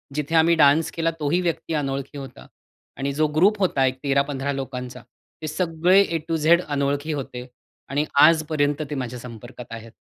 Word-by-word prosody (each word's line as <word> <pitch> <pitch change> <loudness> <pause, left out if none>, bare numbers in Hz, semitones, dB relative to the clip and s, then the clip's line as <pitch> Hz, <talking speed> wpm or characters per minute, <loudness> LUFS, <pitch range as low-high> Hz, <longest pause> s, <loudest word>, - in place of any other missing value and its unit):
जिथे 150 +2 -2
आम्ही 165 +1 +5
डान्स 155 +2 +4
केला, 165 0 -1
तोही 155 +4 +1
व्यक्ती 165 -1 -2
अनोळखी 140 -1 -3
होता 135 -2 -10 0.5
आणि 140 +1 -2
जो 155 +1 +1
ग्रुप 200 +6 +4
होता 140 -8 +2
एक 130 0 -1
13-15 140 0 0
लोकांचा, 125 -2 -6 0.4
ते 155 - -4
सगळे 170 +3 +2
ए 170 -4 0
टु 165 - 0
झेड 170 +3 +4
अनोळखी 145 +1 -1
होते 125 -3 -6 0.4
आणि 145 +2 0 0.2
आजपर्यंत 155 -2 +3
ते 145 - -4
माझ्या 125 -2 -5
संपर्कात 120 0 -10
आहेत. 115 0 -9
145 Hz, 165 wpm, -23 LUFS, 135-160 Hz, 0.5 s, आम्ही